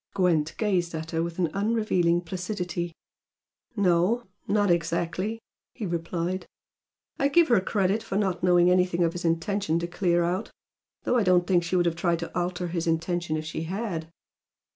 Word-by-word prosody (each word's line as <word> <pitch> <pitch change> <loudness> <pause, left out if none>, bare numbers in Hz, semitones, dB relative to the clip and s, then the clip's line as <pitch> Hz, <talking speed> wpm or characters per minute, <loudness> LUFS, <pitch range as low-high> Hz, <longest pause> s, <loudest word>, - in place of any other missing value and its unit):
Gwent 165 -5 +1
gazed 180 -6 0
at 160 0 -5
her 165 -1 0
with 170 0 -4
an 170 -4 0
unrevealing 200 -5 +1
placidity. 180 -1 -4 0.8
"No. 195 +4 +2 0.2
Not 205 -2 +2
exactly," 170 +5 -1 0.4
he 225 - -4
replied 170 +1 -3 0.7
"I 275 - +3
give 325 +2 +4
her 230 -6 +5
credit 195 +2 +1
for 195 - -5
not 190 -4 0
knowing 175 0 +5
anything 180 -1 +2
of 165 0 +1
his 175 - -5
intention 165 +1 0
to 170 - -1
clear 175 0 +1
out. 180 +5 -1 0.5
Though 250 - +2
I 230 - +3
don't 180 -2 +4
think 180 -2 +3
she 175 +2 -2
would 175 -1 +3
have 170 -1 +1
tried 170 0 +1
to 170 0 -7
alter 175 0 -2
his 170 -1 -2
intention 165 0 0
if 155 - -5
she 160 +1 -4
had." 180 -3 -4
175 Hz, 170 wpm, -26 LUFS, 170-195 Hz, 0.8 s, her